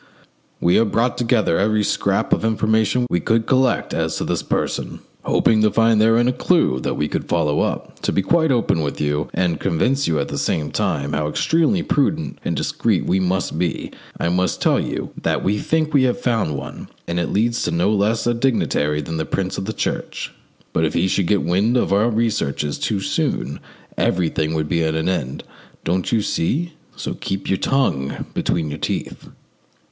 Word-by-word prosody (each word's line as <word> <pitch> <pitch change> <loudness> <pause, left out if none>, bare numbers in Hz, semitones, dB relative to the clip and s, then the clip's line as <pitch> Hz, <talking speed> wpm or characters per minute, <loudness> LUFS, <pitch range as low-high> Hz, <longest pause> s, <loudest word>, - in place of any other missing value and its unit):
We 85 - +3
have 110 -3 +2
brought 120 +2 +1
together 115 -7 +1
every 105 +1 +2
scrap - - +1
of - - 0
information 110 +2 +2
we 85 - +2
could 110 +6 +1
collect 130 -1 +1
as - - -1
to - - -2
this - - -1
person, - - -2 0.2
hoping 110 -1 +3
to 110 - +4
find 115 0 +3
therein 115 +2 +4
a 125 - +2
clue 65 - +2
that - - -2
we 75 - 0
could - - -3
follow 75 -4 +1
up. - - -3
To - - 0
be 100 - +1
quite 160 - +2
open 115 -9 +1
with 70 -2 -3
you, 75 +1 -1
and 85 -4 0
convince 125 - +1
you 80 - +1
at 70 - -2
the - - -3
same 75 -2 -1
time 75 -9 -1
how 75 0 0
extremely 165 - +1
prudent 155 +2 0
and - - -1
discreet - - 0
we 95 - +2
must 90 -3 -1
be, 85 -3 -2 0.3
I - - 0
must 90 0 0
tell - - +3
you - - -3
that - - 0
we 105 +2 +1
think 155 +3 0
we 140 - +5
have 125 - 0
found 110 - 0
one, - - -8 0.2
and 85 +1 -1
that 85 - 0
it - - -6
leads 115 +3 +1
to - - 0
no 90 +5 +2
less 105 +2 +1
a 120 - +2
dignitary 75 - 0
than 80 +2 -4
a 80 - -1
Prince 95 -1 -2
of 95 - -4
the 110 - -2
Church. 110 - -3 0.4
But 80 - +1
if 80 - 0
he 85 +2 +2
should 95 -1 +1
get 100 0 +2
wind 100 +8 +2
of 120 - +1
our 105 +4 +3
researches 105 -11 -1
too 105 -3 -1
soon - - -1 0.4
everything 80 -3 0
would 80 -1 -1
be 85 -1 +1
at 80 0 0
an 80 +1 -1
end, 70 -8 -2 0.4
don't 90 +2 -1
you 110 -3 +2
see? 155 - -1 0.2
So - - -4
keep 95 0 -4
your 95 - +1
tongue 70 - 0
between 80 -3 -1
your 75 - -6
teeth." - - -4
100 Hz, 200 wpm, -20 LUFS, 80-115 Hz, 0.4 s, we